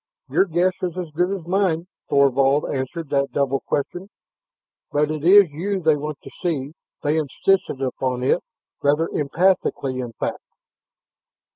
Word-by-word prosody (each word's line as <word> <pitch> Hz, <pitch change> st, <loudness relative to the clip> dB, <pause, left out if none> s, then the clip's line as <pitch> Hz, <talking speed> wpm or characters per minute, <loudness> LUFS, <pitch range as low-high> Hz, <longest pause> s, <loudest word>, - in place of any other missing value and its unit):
"Your -, -, +3 dB
guess 180 Hz, +1 st, +1 dB
is 180 Hz, -1 st, -3 dB
as 175 Hz, -4 st, -4 dB
good 175 Hz, +4 st, +1 dB
as 195 Hz, -4 st, -4 dB
mine," 175 Hz, -2 st, +1 dB, 0.2 s
Thorvald 140 Hz, 0 st, +3 dB
answered 140 Hz, +4 st, -4 dB
that 140 Hz, -1 st, +1 dB
double 135 Hz, -1 st, 0 dB
question. 175 Hz, +9 st, -3 dB, 0.8 s
"But 150 Hz, +1 st, +1 dB
it 155 Hz, -1 st, -4 dB
is 190 Hz, -1 st, +7 dB
you 190 Hz, +6 st, -2 dB
they 160 Hz, -3 st, +3 dB
want 150 Hz, 0 st, -5 dB
to -, -, -10 dB
see; 150 Hz, -6 st, -1 dB, 0.3 s
they 150 Hz, +2 st, +1 dB
insisted 155 Hz, 0 st, 0 dB
upon 130 Hz, -1 st, -2 dB
it, 135 Hz, -, +2 dB, 0.4 s
rather 150 Hz, +3 st, +2 dB
emphatically 150 Hz, -4 st, 0 dB
in 120 Hz, -2 st, -5 dB
fact." -, -, -3 dB
155 Hz, 145 wpm, -22 LUFS, 140-180 Hz, 0.8 s, is